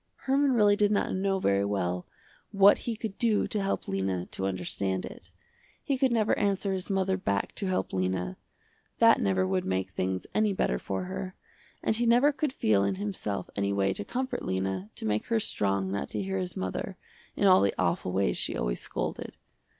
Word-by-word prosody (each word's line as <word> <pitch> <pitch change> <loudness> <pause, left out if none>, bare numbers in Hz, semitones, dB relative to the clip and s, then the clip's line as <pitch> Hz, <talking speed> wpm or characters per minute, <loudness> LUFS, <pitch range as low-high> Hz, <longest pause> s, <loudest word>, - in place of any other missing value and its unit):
Herman 275 0 +3
really 210 -3 +5
did 205 0 +2
not 205 - +1
know 195 0 0
very 100 - +2
well 90 -3 -2 0.4
what 200 0 +6
he 230 - -1
could 215 -2 -6
do 225 -4 +2
to 210 - -1
help 195 - -2
Lena 95 -2 -1
to 95 - -2
understand 95 0 -2
it. - - -11 0.5
He 280 - 0
could 260 -1 +2
never 220 -2 +2
answer 200 -1 +1
his 190 +1 -4
mother 190 -1 +1
back 100 - -1
to 195 - -1
help 185 - -1
Lena, 95 -1 -1 0.6
that - - +6
never 95 -1 +2
would 95 -1 0
make 95 0 -2
things 95 0 -2
any 215 -1 +2
better 60 - 0
for 95 - -3
her, 185 0 -5 0.5
and 220 - +1
he 240 0 +1
never 245 +5 +5
could 285 0 -1
feel 105 - +2
in 100 -1 0
himself 100 -1 -3
any 100 0 0
way 95 -1 +1
to 100 - -4
comfort 260 - -3
Lena, 95 +1 -2
to - - -5
make 105 0 0
her 230 -1 +2
strong 100 - 0
not 100 - -2
to - - -2
hear 195 0 -2
his 180 -1 -4
mother, 95 0 -4 0.4
in - - +1
all 185 -1 +7
the 100 - +1
awful 90 - 0
ways 95 +1 +1
she - - 0
always - - -1
scolded. - - -4
105 Hz, 195 wpm, -28 LUFS, -, 0.6 s, all